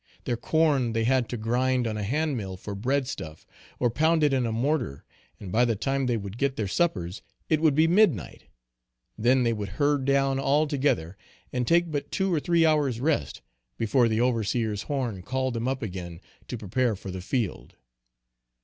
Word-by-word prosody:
Their 120 - -1
corn 140 -2 +1
they 115 0 0
had 125 0 +2
to 120 - -3
grind 125 +3 +1
on 110 -1 -2
a 105 - -3
hand 145 +8 0
mill 95 -5 -5
for 100 +2 -7
bread 130 +6 0
stuff, 80 - -7 0.3
or 120 -2 +1
pound 160 +5 +2
it 145 -2 +3
in 130 -3 +1
a - - -2
mortar; 120 - -1 0.3
and 95 -3 -8
by 115 +5 +3
the 115 -2 +2
time 135 +5 -1
they 120 -2 +1
would 100 +2 -7
get 140 -1 +1
their 105 -5 -2
suppers 95 - -1 0.3
it 155 -1 +2
would 155 -4 +4
be 155 +2 +5
midnight; 170 - +2 0.7
then 125 +3 +3
they 115 -1 +2
would 105 -3 -4
herd 145 -2 +2
down 135 -1 +2
all 140 +3 +2
together 130 - -1 0.4
and 125 -1 -1
take 170 0 +3
but 145 -2 -3
two 190 -2 0
or 160 - +2
three 170 +1 +3
hours 145 -7 +2
rest, 135 - -1 0.3
before 120 +2 +3
the 110 0 0
overseer's 115 -3 0
horn 120 -7 -3
called 130 +5 -2
them 115 +1 -2
up 130 -1 -2
again 90 -4 -6 0.3
to 125 - -4
prepare 110 +3 0
for 95 0 -8
the 95 0 -6
field. 110 0 -3
125 Hz, 195 wpm, -26 LUFS, 110-140 Hz, 0.7 s, be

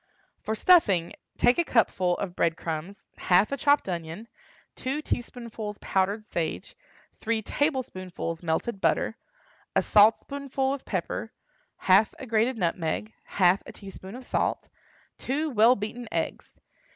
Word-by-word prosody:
For 220 - -3
stuffing, 210 - +4 0.2
take 245 +6 +4
a - - +4
cupful 185 - +2
of 180 -3 -4
bread 165 -1 +1
crumbs, 165 +5 -5 0.2
half 185 +5 +3
a 280 - -1
chopped 285 -1 +3
onion, 170 +4 -5 0.5
two 265 +3 -3
teaspoonfuls 230 -5 -5
powdered 200 +3 0
sage, 165 -6 -4 0.4
three 225 0 -1
tablespoonfuls 185 - -2
melted 180 +5 -2
butter, - - +1 0.6
a - - +3
saltspoonful 265 +5 +3
of 280 - -7
pepper, - - -3 0.5
half 195 +3 +4
a - - -8
grated 230 +2 +1
nutmeg, 175 +3 -2
half 185 0 +3
a - - -7
teaspoonful 195 +3 -10
of - - -16
salt, - - -1 0.5
two 300 +4 -1
well 235 +1 +5
beaten 225 +3 -5
eggs. - - -3
215 Hz, 130 wpm, -27 LUFS, 185-250 Hz, 0.6 s, well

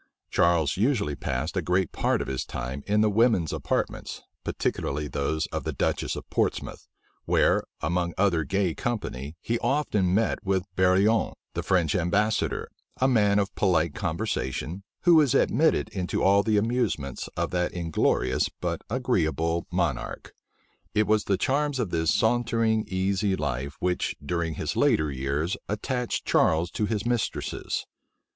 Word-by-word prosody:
Charles 85 -3 +2
usually 105 - +1
passed 65 +6 -3
a 95 - +1
great 90 +1 +1
part - - 0
of - - -10
his 65 -1 -2
time 65 +3 -5
in 105 +1 +3
the 110 - +4
women's 105 -7 +3
apartments, - - -2 0.2
particularly 75 +2 -2
those 75 +2 -1
of - - -3
the - - -2
duchess - - -1
of - - -7
Portsmouth; - - -1 0.4
where, - - +3 0.2
among 85 +1 -1
other 90 -5 +2
gay 90 +3 0
company, 80 - -4
he 115 0 -1
often 105 -11 +1
met 110 +2 +1
with 95 -1 +1
Barillon, 95 +4 +3 0.2
the - - -2
French 85 -5 +1
ambassador, 100 +5 0 0.3
a 130 - +4
man 105 -5 +3
of 100 -1 0
polite 85 -5 +2
conversation, 85 -1 -3 0.2
who 175 - +5
was 145 -5 +5
admitted 160 +3 +3
into 90 -3 -2
all 100 +1 +5
the 110 0 +1
amusements 105 - -1
of - - -1
that 90 0 0
inglorious 85 -3 +1
but - - -2
agreeable 85 -9 0
monarch. 85 -8 -2 0.6
It 105 - +4
was 105 0 +2
the 95 - +1
charms 145 +6 0
of 110 -8 -2
this 80 -2 +1
sauntering, 115 -1 +2
easy 95 +1 0
life, 70 -2 -3
which, 90 0 -1
during 85 0 -1
his - - -3
later 75 -1 +2
years, 70 +6 -1
attached 125 +4 -2
Charles 80 +2 +2
to 105 - -1
his 105 -1 -2
mistresses. 120 -2 -2
95 Hz, 150 wpm, -26 LUFS, 80-110 Hz, 0.6 s, who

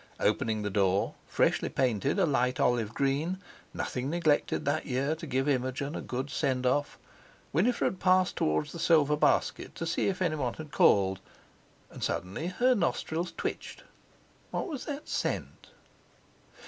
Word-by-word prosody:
Opening 110 0 +1
the 105 - -2
door—freshly 95 0 +1
painted 130 - 0
a 195 - +4
light 125 -3 +1
olive 120 -5 +2
green; 140 +8 0 0.3
nothing 130 +2 -3
neglected 160 -2 +1
that 145 +3 0
year 135 +3 0
to 160 +1 -7
give 135 +1 0
Imogen 135 +1 -1
a - - -3
good 130 +3 -4
send 130 -4 0
off—Winifred 165 - -1
passed 185 -1 +3
towards 80 - 0
the 170 - -7
silver 150 -3 +4
basket 150 - +1
to 165 - -4
see 165 - 0
if 195 -2 -1
anyone 155 -9 0
had 155 -2 -9
called, 95 -6 +4 0.7
and - - -8
suddenly 100 - -2
her 245 +8 +3
nostrils 170 -4 -1
twitched. - - -4 0.7
What - - -2
was 295 -7 -5
that 290 0 -5
scent? - - -3
145 Hz, 140 wpm, -29 LUFS, 125-165 Hz, 0.7 s, a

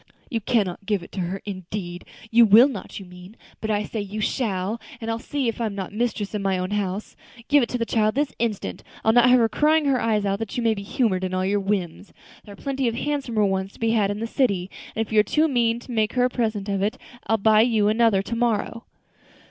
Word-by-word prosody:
"You 230 -3 -1
can 220 0 +2
not 180 +2 -7
give 205 -4 0
it - - -13
to - - -6
her, 185 +2 -3
indeed! 185 -2 -6 0.3
You 235 +1 +7
will 225 +6 +8
not, 215 -8 -7
you 195 - -10
mean; 180 +3 -13 0.2
but 220 - -4
I 210 -1 +1
say 215 +1 -4
you 205 +1 -6
shall; 215 -1 -1 0.2
and 225 0 -3
I'll 225 - -2
see 275 +1 -2
if 230 +1 -2
I'm 215 -3 -2
not 195 0 -5
mistress 220 -2 -2
in 210 - -2
my 195 -1 0
own 185 +2 -3
house. 205 0 -3 0.3
Give 290 0 +6
it 235 - -1
to 245 - -1
the 230 - -1
child 215 -1 +1
this 285 0 0
instant; 225 -4 -2 0.2
I'll 220 - +5
not 245 +1 +6
have 250 - +7
her 230 -2 +4
crying 300 +7 +2
her 270 -3 +2
eyes 215 -2 +1
out 200 0 0
that 225 0 -5
you 240 - -1
may 225 -1 +3
be 200 - -6
humored 200 -2 0
in 185 0 -2
all 185 0 0
your 205 +2 +1
whims. 195 -2 -3 0.3
There 205 - -10
are - - -12
plenty 270 +3 -2
of 230 - -1
handsomer 255 -6 0
ones 190 0 -1
to - - -18
be 225 0 +1
had 210 -3 +2
in 205 +1 -3
the 225 - -2
city, 200 -7 0 0.2
and 225 - 0
if 220 - -10
you 215 - +5
are - - +6
too 305 +9 +2
mean 235 -5 +1
to 250 - -11
make 220 -2 0
her 250 -1 +3
a - - +2
present 215 -5 -1
of 200 -1 -1
it, 205 +2 0 0.3
I'll 225 - +3
buy 215 +1 +5
you 220 -3 +3
another 215 -2 +3
to 230 - -4
morrow." 230 0 -1
215 Hz, 260 wpm, -24 LUFS, 195-235 Hz, 0.3 s, will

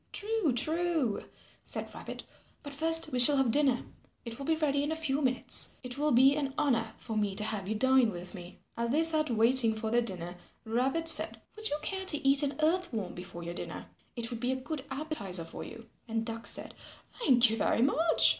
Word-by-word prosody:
"True, 425 -6 -1
true," 315 -3 -1 0.4
said - - -5
Rabbit, - - -9 0.4
"but 285 -1 -9
first 325 +3 +4
we 250 - -2
shall 280 +4 +6
have 265 -4 +1
dinner. 270 -2 +1 0.4
It 230 +1 -7
will 275 - -7
be 320 - +1
ready 285 -3 -1
in 295 +2 -3
a - - -2
few 300 -3 -2
minutes. 255 -2 +4
It 250 +2 -3
will 300 0 0
be 265 +3 +4
an 280 -2 -4
honour 240 -7 -1
for 225 - -7
me 205 -2 -2
to 210 - +2
have 205 -3 -4
you 220 - -2
dine 260 +1 +3
with 180 -1 -9
me." 180 -2 -11 0.2
As 235 0 -3
they 300 +6 +1
sat 310 -2 +1
waiting 230 0 +2
for 220 0 -5
their 240 +1 +2
dinner, 180 -5 -5 0.3
Rabbit 265 +9 -1
said, 320 -2 +7 0.2
"Would 435 0 +1
you 295 - -2
care 380 +2 -5
to 300 -5 +3
eat 275 0 +5
an 285 -1 -2
Earth 350 +3 0
Worm 210 -6 -5
before 175 -1 -10
your 170 0 -6
dinner? - - -8 0.2
It 235 0 -3
would 235 - -6
be 250 +2 -2
a - - -1
good 270 +2 -7
appetizer 205 - -1
for - - -9
you." 230 0 -12 0.2
And 225 0 -3
Duck 225 0 -1
said, - - +2 0.5
"Thank 250 - +3
you 225 - -3
very 225 +2 0
much. 320 +5 +4
260 Hz, 215 wpm, -29 LUFS, 225-300 Hz, 0.5 s, said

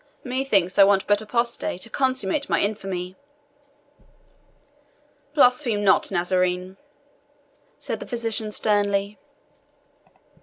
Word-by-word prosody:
Methinks 250 -9 0
I - - +10
want 195 -1 +3
but 205 0 +2
apostasy 235 -2 -1
to 185 - -6
consummate 260 +1 -1
my - - +2
infamy." 190 -3 -3 2.2
"Blaspheme 250 -6 +3
not, 195 - +3
Nazarene," 180 0 -1 1.0
said - - -5
the - - -9
physician 225 -2 -1
sternly. 205 -1 0
205 Hz, 90 wpm, -23 LUFS, 190-235 Hz, 2.2 s, I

